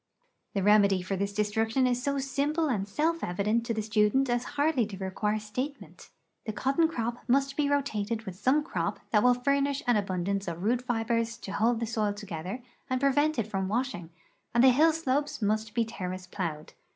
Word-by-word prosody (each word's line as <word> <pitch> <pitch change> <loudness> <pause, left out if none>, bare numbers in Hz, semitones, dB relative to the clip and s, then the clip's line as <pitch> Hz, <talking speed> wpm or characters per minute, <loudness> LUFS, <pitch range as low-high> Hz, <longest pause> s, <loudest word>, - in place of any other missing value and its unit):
The 195 - +1
remedy 200 -2 +4
for 195 +2 -2
this 200 +1 -1
destruction 220 +4 +1
is 250 -1 +1
so 280 +2 -1
simple 285 +4 0
and 200 -6 -1
self 320 +10 0
evident 210 +6 0
to 230 - 0
the 215 - -1
student 215 +5 +2
as 240 0 +1
hardly 285 -6 +2
to 200 -3 -8
require 200 +3 -1
statement; 255 +7 -6 0.4
the - - 0
cotton 275 +9 +2
crop 240 -6 -3
must 275 +2 +2
be 290 -2 +1
rotated 230 -6 -1
with 190 -4 -7
some 270 +10 +2
crop 320 - -2
that 210 - +4
will 250 +1 +5
furnish 280 +3 0
an 245 -2 +3
abundance 195 0 -1
of 170 +1 -4
root 240 +4 +2
fibers 230 -1 -1
to 195 - -8
hold 225 +3 +1
the 230 - -1
soil 215 -2 -1
together 200 +3 -6 0.3
and 255 0 0
prevent 290 +3 +2
it 230 - 0
from 195 -3 -2
wash 250 +6 0
ing, 175 -2 -8 0.5
and 235 - +5
the 265 - +9
hill 310 +6 +5
slopes 290 -2 -1
must 215 0 -1
be 230 - +2
terrace 185 -4 -5
plowed. 170 -5 -5
230 Hz, 195 wpm, -29 LUFS, 205-270 Hz, 0.5 s, the